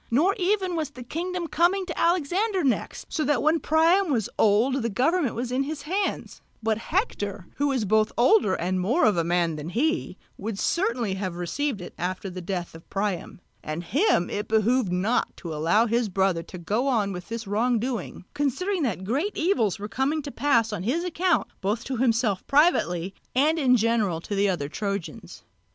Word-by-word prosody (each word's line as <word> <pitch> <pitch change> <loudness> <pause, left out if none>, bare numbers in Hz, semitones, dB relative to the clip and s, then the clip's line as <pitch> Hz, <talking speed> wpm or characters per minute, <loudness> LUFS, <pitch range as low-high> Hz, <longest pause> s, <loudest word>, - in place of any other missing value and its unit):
Nor 315 +12 +3
even 375 -1 +1
was 315 -4 -2
the 260 -4 -10
kingdom 350 +6 -3
coming 350 +4 +2
to 330 - -5
Alexander 365 +4 +1
next, 265 -4 -1
so 310 - 0
that 290 -3 +1
when 315 +2 +3
Priam 330 +5 +3
was 225 -6 0
old 230 +6 +3
the 230 - -1
government 270 - +1
was 240 +1 -3
in 255 +2 +1
his 290 +1 -4
hands; 380 +6 -2 0.2
but 220 -1 +1
Hector, 205 - -2
who 285 - +1
was 260 -6 0
both 215 +2 +2
older 240 - +4
and 185 +2 -1
more 235 - +2
of 210 - +4
a 170 - +1
man 170 -2 +1
than 150 +2 -6
he, 295 - -1 0.2
would 210 0 -4
certainly 235 - 0
have 190 -2 -3
received 210 - -2
it 175 - -8
after 185 +2 -3
the 185 0 -6
death 180 -1 -4
of 165 0 -14
Priam; 195 -3 -3 0.2
and 155 +3 -4
him 215 - +2
it 205 +1 -3
behoved 220 -1 +2
not 195 +7 0
to 165 -3 -6
allow 165 +9 +3
his 235 -1 0
brother 190 -2 +1
to 175 +2 -10
go 210 +10 -1
on 215 -7 +1
with 180 -1 -8
his 230 0 -4
wrong 230 +5 +1
doing, 230 -6 -4
considering 360 +7 -1
that 220 -9 -1
great 285 - -1
evils 250 - +1
were 205 +1 -5
coming 270 +8 -1
to 280 - -6
pass 230 -7 +2
on 180 - -3
his 265 - 0
account 360 0 +1 0.2
both 210 +5 -1
to 260 -1 -4
himself 230 -5 +1
privately 195 - +2 0.2
and 305 +5 +3
in 255 -4 +4
general 220 -7 +1
to 185 - -6
the 200 0 +2
other 170 -7 -1
Trojans. 200 +2 -5
235 Hz, 190 wpm, -25 LUFS, 195-305 Hz, 0.2 s, older